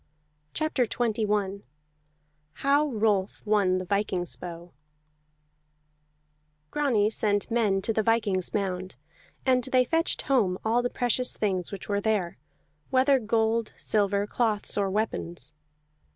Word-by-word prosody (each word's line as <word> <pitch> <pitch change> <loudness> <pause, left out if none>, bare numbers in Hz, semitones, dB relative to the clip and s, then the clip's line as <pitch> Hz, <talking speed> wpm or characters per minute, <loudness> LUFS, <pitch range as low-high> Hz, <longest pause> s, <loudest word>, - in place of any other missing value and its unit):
CHAPTER 305 -6 0
XXI 210 -4 -1 0.9
HOW 285 +2 +2
ROLF 210 -7 0
WON 200 -3 +2
THE 185 - -4
VIKING'S 185 -2 -1
BOW 175 0 -9 2.0
Grani 235 -8 +2
sent 205 0 0
men 205 -5 +1
to 225 - 0
the 220 - +2
viking's 215 -4 +1
mound, 185 -5 -3 0.5
and 255 -2 +3
they 255 -1 +3
fetched 325 +5 0
home 210 -10 +2
all 230 +2 +3
the 245 - -1
precious 245 +1 -1
things 185 -4 -1
which 200 -2 -7
were 205 0 0
there, 200 - -1 0.5
whether 265 +1 +4
gold, 225 0 0
silver, 200 -1 +1
cloths 215 -1 0
or 200 -1 +1
weapons. 175 - -3
210 Hz, 120 wpm, -27 LUFS, 195-240 Hz, 2.0 s, whether